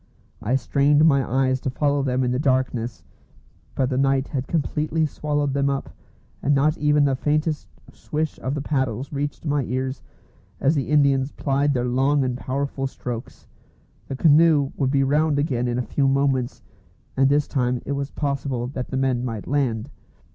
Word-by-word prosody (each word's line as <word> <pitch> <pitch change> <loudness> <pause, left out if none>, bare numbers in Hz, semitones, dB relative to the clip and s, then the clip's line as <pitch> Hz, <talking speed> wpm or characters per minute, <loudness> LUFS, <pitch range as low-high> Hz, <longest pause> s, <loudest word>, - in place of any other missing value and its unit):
I 120 +5 0
strained 145 +3 +3
my 140 -4 +4
eyes 130 +1 +1
to - - -2
follow 145 +2 +1
them 130 -1 0
in 125 - 0
the 125 - 0
darkness, 130 -5 0 0.7
but 130 0 0
the 130 - 0
night 135 0 +1
had 130 -1 -3
completely 155 0 0
swallowed 145 -1 -1
them 140 0 +1
up, 140 0 -3 0.5
and 145 - +2
not 150 +3 +3
even 150 -1 +3
the 135 -1 +2
faintest 150 -3 -1 0.3
swish 155 0 -3
of 130 +3 -3
the 145 - -3
paddles 130 -2 -2
reached 145 +3 -3
my 145 -2 +1
ears 130 +2 -3 0.6
as 140 - +3
the 140 -4 -2
Indians 140 -2 +3
plied 140 0 0
their 125 -1 0
long 135 +3 +2
and 125 -1 -1
powerful 135 +1 -3
strokes. 120 -3 -7 0.6
The 135 - -4
canoe 150 -1 +4
would 135 - 0
be 135 0 +2
round 150 +2 +2
again 130 -4 0
in 120 0 -1
a 125 - 0
few 135 +3 0
moments, 135 -2 0 0.5
and 135 0 +4
this 145 +1 +2
time 125 -3 0
it - - -4
was 140 0 -2
possible 140 -4 -2
that 130 -2 -5
the 130 - -2
men 130 -2 +1
might 115 -5 -4
land. 135 -3 -1
135 Hz, 175 wpm, -23 LUFS, 130-145 Hz, 0.7 s, my